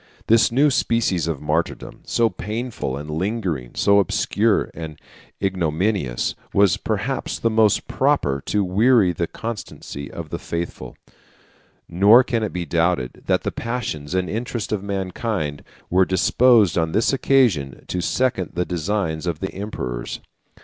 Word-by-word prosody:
This 115 +1 +4
new 140 +4 +4
species 110 - +1
of 80 -3 -3
martyrdom, 80 +3 -2
so 115 - +2
painful 110 - -4
and 75 +1 -7
lingering, 80 - -2
so 100 0 +4
obscure 105 +2 +1
and 80 -2 -7 0.4
ignominious, 90 - 0 0.2
was, 100 -4 +5
perhaps, - - -2
the 115 - 0
most 110 -2 +3
proper 70 -1 +1
to 105 -1 +1
weary 105 +1 +4
the 85 0 -2
constancy 105 -11 -7
of - - -8
the - - -3
faithful: 85 0 -5 0.9
nor 105 +8 +6
can 120 -3 -1
it 110 - -2
be 90 -1 -3
doubted 85 -5 0
that - - +2
the - - -1
passions 105 -11 -4
and 90 -1 0
interest 115 0 -4
of 105 -3 -1
mankind 95 -5 -3 0.3
were 95 +2 +5
disposed 100 +1 +4
on 80 -1 -1
this 110 +5 +2
occasion 115 - +2
to 90 - -3
second 105 -1 0
the 90 +1 0
designs 90 -2 -2
of 85 -3 -2
the 95 - -4
emperors. 90 - -5
95 Hz, 140 wpm, -22 LUFS, 80-110 Hz, 0.9 s, nor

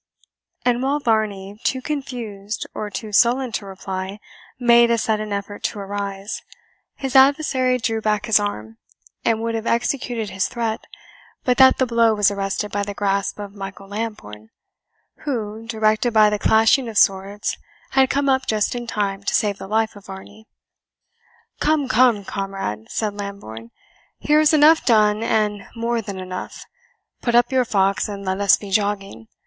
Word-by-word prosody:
And 245 0 +2
while 275 +2 +1
Varney, 210 -5 -1
too 260 - 0
confused 240 -8 -5
or 210 - -4
too 215 0 -6
sullen 245 +4 +3
to 205 -2 -4
reply, 190 +1 -6 0.4
made 235 -1 +5
a 235 - +3
sudden 215 -1 -1
effort 200 0 -4
to 210 - -2
arise, 200 0 -5 0.5
his 270 -2 -5
adversary 265 -2 +4
drew 225 -2 -2
back 210 -1 0
his 220 -2 +4
arm, 110 - -5 0.4
and 225 -1 +1
would 230 0 -1
have 225 0 -3
executed 235 -3 -1
his 190 0 0
threat, 230 -3 -3 0.6
but 250 -1 +1
that 260 0 +7
the 260 - +2
blow 230 -2 +3
was 205 -1 +3
arrested 200 +1 -3
by 205 - -1
the 200 0 -4
grasp 200 -1 -1
of 205 -1 -7
Michael 195 -1 -9
Lambourne, 200 - -6 0.7
who, 225 -5 -4
directed 220 +1 +1
by 215 -1 +6
the 210 - -1
clashing 225 +4 +3
of 215 - -5
swords 195 +1 +1 0.4
had 265 -1 +4
come 280 0 0
up 265 -1 +2
just 215 -1 +1
in 240 -1 -5
time 200 -3 -2
to 200 - -1
save 205 -2 0
the - - -7
life 220 +1 0
of 205 - -14
Varney. 205 +3 -11 1.1
"Come, 300 -3 +1
come, 235 -4 +3
comrade;" 195 - -4
said 215 -2 -2
Lambourne, 200 - -8 0.5
"here 300 +1 +3
is 310 -1 +4
enough 310 +1 +6
done 215 -2 +3
and 210 -3 0
more 230 0 -1
than 200 -3 -7
enough; 185 0 -7 0.6
put 240 -1 0
up 240 +1 +4
your 260 -1 +2
fox 195 -3 +1
and 200 -1 -6
let 190 +1 -2
us 200 -2 +5
be 200 -2 -10
jogging. 195 - -1
215 Hz, 165 wpm, -21 LUFS, 200-240 Hz, 1.1 s, that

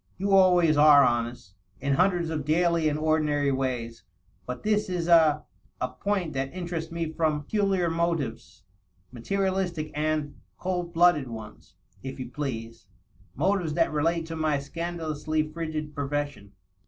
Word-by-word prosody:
You 195 +1 0
always 180 -5 +5
are 145 -1 +8
honesty 120 -5 -2 0.3
in 140 +1 0
hundreds 175 +1 +2
of 155 -2 -2
daily 165 +1 +2
and 150 - -1
ordinary 150 -2 +1
ways. 125 -4 -3 0.4
But 125 0 -5
this 210 -1 +1
is 175 -2 -2
a.. 160 -3 +5 0.4
a 125 - -1
point 175 +5 -2
that 135 0 -2
interests 170 -2 -4
me 165 -1 -3
from 155 -2 0
pecu 210 +8 -1
liar 185 -3 +1
motives 165 - -2 0.3
— 90 +5 -36
^materialistic 185 +2 -2
and.. 150 -1 -2 0.2
cold 180 -2 -3
blooded 170 -5 +4
ones, 110 -3 -10 0.3
if 135 0 -7
you 125 -1 -6
please 115 -7 -5 0.2
— 95 +2 -30
motives 185 -6 0
that 165 -2 +2
relate 165 +2 +1
to 165 0 -6
my 155 -2 +1
scandalously 155 0 -3
frigid 155 -1 -5
profession. 145 -7 -4
155 Hz, 150 wpm, -27 LUFS, 140-170 Hz, 0.4 s, are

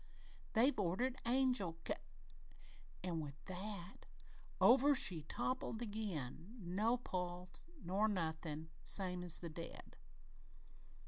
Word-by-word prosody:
They've 245 +3 +4
ordered 205 +8 +1
angel 245 -9 +3
ca - - +1 0.6
' - - -21
An' 175 -3 -1
with 145 -3 -5
that, 190 0 -6 0.5
over 275 +4 +7
she 180 -10 +3
toppled 230 - -2
again, 200 - -4
no 210 +6 +1
pulse 180 - -4 0.2
nor 195 +5 +2
nothin', 160 -4 -2
same 180 -2 +2
as 175 -2 0
the 170 - -4
dead!" 165 +1 -8
185 Hz, 110 wpm, -40 LUFS, 170-225 Hz, 0.6 s, over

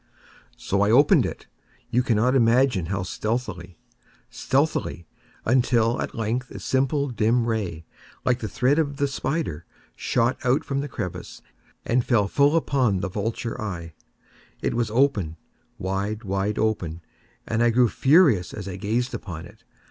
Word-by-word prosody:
So 100 +1 -1
I 100 - +3
opened 140 +6 +5
it—you 120 0 -5
cannot 120 +1 +2
imagine 120 -6 +3
how 95 +1 -2
stealthily, 95 -4 -4 0.5
stealthily—until, 120 - 0
at - - -4
length 115 +3 -2
a - - -8
simple 135 +2 0
dim 115 0 +1
ray, 95 -9 -3 0.4
like 125 -1 +2
the 110 - -4
thread 130 +8 +2
of 145 -3 -1
the 140 - +1
spider, 135 - -3 0.3
shot 120 +1 0
from 135 +2 0
out - - 0
the 145 - -4
crevice 105 -10 -6 0.4
and 120 +1 +2
fell 115 -6 +2
full 140 +7 +3
upon 130 - +1
the 100 - -2
vulture 110 +4 -3
eye. 85 -6 -5 0.7
It - - 0
was 115 -2 0
open—wide, 105 - -2
wide 100 +1 -1
open—and 105 +2 -3
I 120 - +4
grew 120 +1 +4
furious 135 - +3
as 100 -3 -6
I 95 -1 -5
gazed 115 +5 -1
upon 85 -4 -6
it. 110 +5 -17
115 Hz, 140 wpm, -24 LUFS, 100-130 Hz, 0.7 s, opened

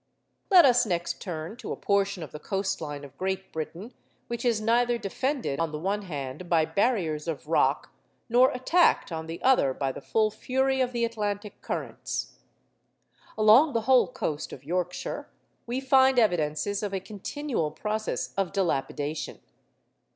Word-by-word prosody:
Let 360 -5 +8
us 250 -2 +5
next 175 -6 -2
turn 170 +3 -5
to - - -7
a - - -1
portion 200 -3 0
of 150 - -9
the 150 - -8
coast 195 +1 -2
line 145 -2 -5
of 140 -1 -14
Great 190 0 -3
Britain 170 +8 -6 0.4
which 235 0 -3
is 235 -3 +2
neither 240 +2 +2
defended, 235 - -2
on 165 -2 0
the 150 - -4
one 195 +6 -1
hand, 150 -1 -6
by 165 -2 +4
barriers 175 -8 0
of 155 -3 -4
rock, 160 - +1 0.4
nor 245 +3 +5
attacked, 290 - +2
on 160 -1 -4
the 165 +1 -6
other, 245 - +4
by 135 -1 -1
the - - -9
full 215 -1 +1
fury 265 +3 0
of 250 -1 +1
the 235 -1 0
Atlantic 210 -2 -4
currents. - - -4 1.0
Along 225 +8 +6
the 230 - +1
whole 255 +2 +4
coast 160 - -4
of 130 - -10
Yorkshire 180 +3 -3 0.4
we 245 +2 -1
find 265 -1 +4
evidences 180 -2 +1
of 200 -2 -3
a - - -1
continual 215 - -3
process 215 +7 -3
of 195 -2 0
dilapidation. 155 -5 -2
200 Hz, 160 wpm, -27 LUFS, 165-240 Hz, 1.0 s, Let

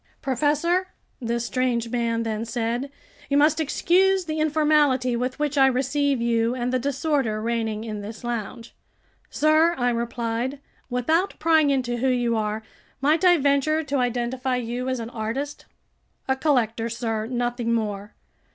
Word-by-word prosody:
"Professor," 300 +8 +1 0.3
this 235 0 -1
strange 235 0 0
man 230 -1 0
then 220 -1 -2
said, 235 +3 -2 0.4
"you 280 - +2
must 300 +2 +4
excuse 370 +5 +2
the 310 -1 -3
informality 295 -5 +2
with 250 +2 -2
which 295 -1 0
I 270 - +7
receive 275 +1 +1
you, 230 0 +1
and 250 0 -2
the 255 - +2
disorder 275 -4 0
reigning 225 -1 -2
in 215 -2 -5
this 215 +3 -8
lounge." 235 -1 -5 0.6
"Sir," 310 +3 +3
I 245 -1 +1
replied, 235 +2 -2 0.3
"without 315 +10 0
prying 315 -2 +3
into 250 -3 0
who 260 +3 +1
you 245 -2 +1
are, 215 0 -2 0.4
might 300 +6 +2
I 355 -1 +6
venture 285 +2 +2
to 285 -1 -2
identify 250 +1 -1
you 245 +1 -3
as 255 -1 -1
an 230 0 -6
artist?" 250 +7 -4 0.6
"A 265 - +2
collector, 235 -5 +1
sir, 225 -2 -3
nothing 240 -1 -1
more. 210 -3 -2
250 Hz, 150 wpm, -24 LUFS, 230-290 Hz, 0.6 s, I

